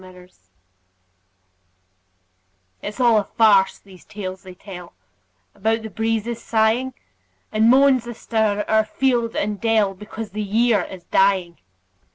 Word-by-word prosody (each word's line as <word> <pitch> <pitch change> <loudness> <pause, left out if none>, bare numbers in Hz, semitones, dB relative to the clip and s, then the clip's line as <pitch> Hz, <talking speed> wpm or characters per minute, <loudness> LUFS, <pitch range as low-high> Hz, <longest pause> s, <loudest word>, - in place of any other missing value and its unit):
MERRY 185 0 -14
AUTUMN 180 - -23 2.5
It's 210 +4 -7
all 235 -3 +4
a - - -1
farce, 200 -2 +3
these 190 -3 -17
tales 190 -3 -7
they 185 -1 -12
tell 180 -3 -11 0.6
About 225 +2 -1
the 220 - -7
breezes 225 +2 -2
sighing, 230 +4 +1 0.6
And 220 +1 +3
moans 260 -2 +4
astir 220 -3 -1
o'er 220 0 +3
field 235 +1 0
and 205 -1 -2
dell, 220 -4 +2
Because 210 +2 -8
the 215 +2 -4
year 215 +1 +2
is 185 -2 -10
dying. 190 -2 +1
215 Hz, 130 wpm, -21 LUFS, 195-230 Hz, 2.5 s, all